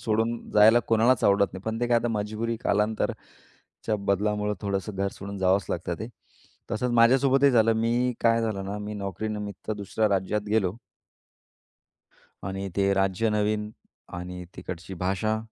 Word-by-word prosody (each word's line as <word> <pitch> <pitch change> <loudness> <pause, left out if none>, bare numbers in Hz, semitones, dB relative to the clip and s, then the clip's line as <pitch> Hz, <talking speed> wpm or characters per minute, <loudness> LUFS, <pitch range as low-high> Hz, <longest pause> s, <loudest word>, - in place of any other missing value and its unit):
सोडून 115 -1 +1 0.2
जायला 110 +3 +6
कोणालाच 115 +2 +3
आवडत 100 0 +3
नाही. 95 - -7
पण 110 +1 -3
ते 120 - +1
काय 120 - +4
आता 120 - -2
मजबुरी 110 +2 -2
कालांतराच्या 105 0 -3
बदलामुळं 105 +1 0
थोडंसं 100 0 -3
घर 100 0 0
सोडून 100 0 -7
जावंच 95 +1 +2
लागतं 85 0 -2
ते. 110 - -5 0.6
तसंच 120 +3 -1
माझ्यासोबतही 135 +4 +5
झालं. 115 -2 +4
मी 120 +3 +1
काय 115 0 +3
झालं 105 -4 -2
ना? 100 +2 -4
मी 105 +1 -5
नोकरीनिमित्त 105 +1 -5
दुसऱ्या 105 +1 -1
राज्यात 100 +1 0
गेलो. 100 -3 +1 1.7
आणि 95 +1 -4
ते 100 0 +3
राज्य 95 +3 +1
नवीन 105 0 0 0.5
आणि 90 0 -7
तिकडची 90 +2 -7
भाषा, 110 +4 0
105 Hz, 145 wpm, -26 LUFS, 100-115 Hz, 1.7 s, जायला